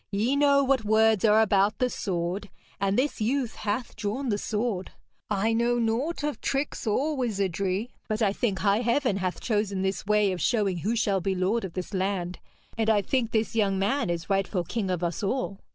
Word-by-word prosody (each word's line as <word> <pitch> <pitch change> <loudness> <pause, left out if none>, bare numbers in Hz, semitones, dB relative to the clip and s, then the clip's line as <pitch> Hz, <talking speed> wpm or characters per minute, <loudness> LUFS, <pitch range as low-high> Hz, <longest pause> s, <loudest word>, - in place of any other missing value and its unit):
'Ye 220 +7 +1
know 280 -1 +4
what 265 -3 +2
words 220 -1 +3
are 215 +1 +6
about 200 0 +2
the 250 - +2
sword, 190 -3 -3 0.3
and 195 0 +1
this 265 -2 0
youth 245 +2 0
hath 220 +4 -3
drawn 225 +6 -3
the 205 - +1
sword. 210 -4 -2 0.4
I 215 +2 +1
know 235 +1 +2
naught 240 +8 -1
of 295 -1 -2
tricks 275 -3 -2
or 290 +8 +1
wizardry, 200 -3 -1 0.2
but 215 -1 -1
I 205 -4 +2
think 205 -4 -1
high 200 +3 +2
Heaven 240 -2 +1
hath 185 -2 -2
chosen 205 -4 -1
this 190 +1 -2
way 210 -2 +3
of 180 -2 -4
showing 205 -4 +1
who 215 +8 -1
shall 200 -4 +1
be 190 +2 -1
lord 195 +6 0
of 185 -3 -5
this 185 +2 -5
land, 185 -2 -2 0.4
and 220 0 +2
I 210 -2 +3
think 245 +1 0
this 225 0 -1
young 200 -3 +2
man 210 +3 0
is 170 -1 -3
rightful 195 -2 0
King 200 +2 -3
of 180 -1 -1
us 170 -1 -2
all.' 200 -1 -2
210 Hz, 200 wpm, -27 LUFS, 195-235 Hz, 0.4 s, are